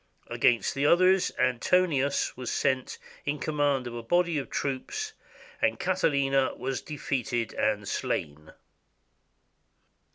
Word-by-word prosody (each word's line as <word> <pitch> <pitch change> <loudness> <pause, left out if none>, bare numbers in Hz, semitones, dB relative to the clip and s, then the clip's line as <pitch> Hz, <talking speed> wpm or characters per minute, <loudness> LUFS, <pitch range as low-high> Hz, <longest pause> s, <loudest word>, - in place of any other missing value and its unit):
Against 120 -1 +2
the 140 +1 +1
others 185 +2 +4
Antonius 140 +3 +1
was 125 -1 -5
sent 130 -2 0 0.3
in 145 +1 -2
command 145 -3 0
of 120 - -6
a 120 - -5
body 170 +5 +1
of 135 - -6
troops, 420 - -3 0.5
and - - +1
Catiline 140 -7 +1
was 135 +1 -3
defeated 130 -6 -3
and 105 -1 0
slain. 75 -5 -3
135 Hz, 110 wpm, -28 LUFS, 125-155 Hz, 0.5 s, others